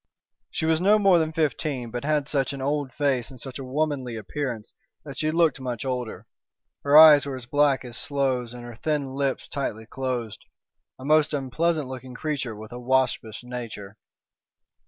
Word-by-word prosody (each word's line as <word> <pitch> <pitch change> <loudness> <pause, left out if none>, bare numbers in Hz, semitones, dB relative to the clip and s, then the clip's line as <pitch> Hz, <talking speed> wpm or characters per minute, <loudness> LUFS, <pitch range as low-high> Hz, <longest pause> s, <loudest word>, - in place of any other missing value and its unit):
She - - -3
was 160 +1 +2
no 205 +3 +5
more 195 -4 +5
than 160 -1 0
fifteen, 150 -6 -1
but 120 +1 -4
had 150 -1 +1
such 140 -2 0
an 140 - -6
old 145 -1 -1
face 130 -3 0
and 130 -2 -12
such 135 +1 -8
a - - -5
womanly 135 -2 -2
appearance 115 0 -5 0.3
that 140 -2 -8
she 155 - +1
looked 160 -3 +2
much 125 -2 -4
older. 125 -3 -4 0.6
Her 145 +1 +6
eyes 150 -3 +9
were 135 - -3
as 130 -2 -8
black 140 0 +2
as 120 -1 -8
sloes 130 -4 -1
and 120 0 -9
her 120 -2 -9
thin 145 -2 -2
lips 135 -1 -1
tightly 110 -6 -4
closed. 120 -4 -4 0.6
A 130 - -10
most 155 0 +3
unpleasant 145 +3 0
looking 130 -1 -8
creature 140 -6 -3
with 110 +1 -10
a 120 - -7
waspish 125 -3 0
nature. 115 -5 -7
135 Hz, 180 wpm, -25 LUFS, 125-150 Hz, 0.6 s, eyes